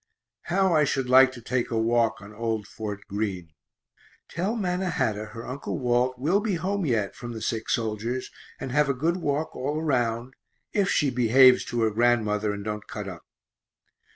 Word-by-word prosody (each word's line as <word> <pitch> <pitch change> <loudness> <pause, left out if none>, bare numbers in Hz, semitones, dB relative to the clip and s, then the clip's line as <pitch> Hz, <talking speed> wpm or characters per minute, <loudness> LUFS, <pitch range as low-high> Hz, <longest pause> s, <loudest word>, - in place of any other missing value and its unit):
How 190 0 +2
I 155 -2 +4
should 135 -2 0
like 130 0 +7
to 120 - -11
take 125 +1 -1
a 115 - -1
walk 115 -2 +1
on 100 +1 -11
old 110 -1 -2
Fort 105 0 -6
Greene 95 -6 -3 0.7
tell 190 +7 -2
Mannahatta 180 - -1
her 115 +2 -9
Uncle 140 +3 -4
Walt 125 0 +1
will 160 +10 +2
be 205 -3 -1
home 190 +1 -1
yet, 110 -6 0
from 120 -1 -7
the 110 - -6
sick 110 0 -2
soldiers, 115 +3 -2 0.3
and 130 - -5
have 145 +1 +2
a 140 - +1
good 165 +7 0
walk 150 -2 -2
all 145 +4 -2
around, 125 -5 -1 0.4
if 200 -2 +2
she 145 -3 +2
behaves 125 +1 +6
to 120 - -2
her 110 -1 +2
grandmother 110 -2 +2
and 100 0 -6
don't 105 -1 -4
cut 105 -1 -6
up. 90 -3 -9
120 Hz, 180 wpm, -26 LUFS, 110-145 Hz, 0.7 s, like